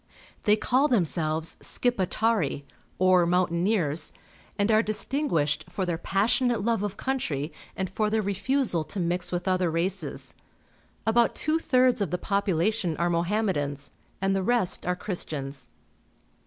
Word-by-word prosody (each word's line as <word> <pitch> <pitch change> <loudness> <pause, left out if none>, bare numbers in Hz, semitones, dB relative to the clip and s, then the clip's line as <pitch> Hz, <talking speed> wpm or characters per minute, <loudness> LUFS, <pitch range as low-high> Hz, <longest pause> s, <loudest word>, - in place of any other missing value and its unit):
They 210 - +6
call 260 +6 +2
themselves 165 - 0
Skipetari, 215 - 0 0.3
or 185 -2 +4
mountaineers, 170 -2 +1 0.5
and 205 +1 +2
are 215 0 +5
distin 270 +7 -1
guished 150 - 0
for 190 - -2
their 170 -2 -2
passionate 225 +4 +1
love 230 -2 +1
of 205 -1 -3
country 160 - -2 0.2
and 190 - -1
for 210 +3 -1
their 220 0 +1
refusal 200 - 0
to 200 - -5
mix 175 +1 -1
with 175 +1 -3
other 185 -2 +2
races. 175 +4 -2 0.7
About 235 +1 +3
two 310 +1 +1
tliirds 255 -6 +3
of 195 - 0
the 180 - -1
population 195 -1 0
are 175 0 +1
Mohammedans, 170 -6 -1 0.3
and 195 0 +1
the 195 - +1
rest 195 -4 +1
are 180 - +1
Christians. 150 - -5
190 Hz, 140 wpm, -27 LUFS, 170-220 Hz, 0.7 s, They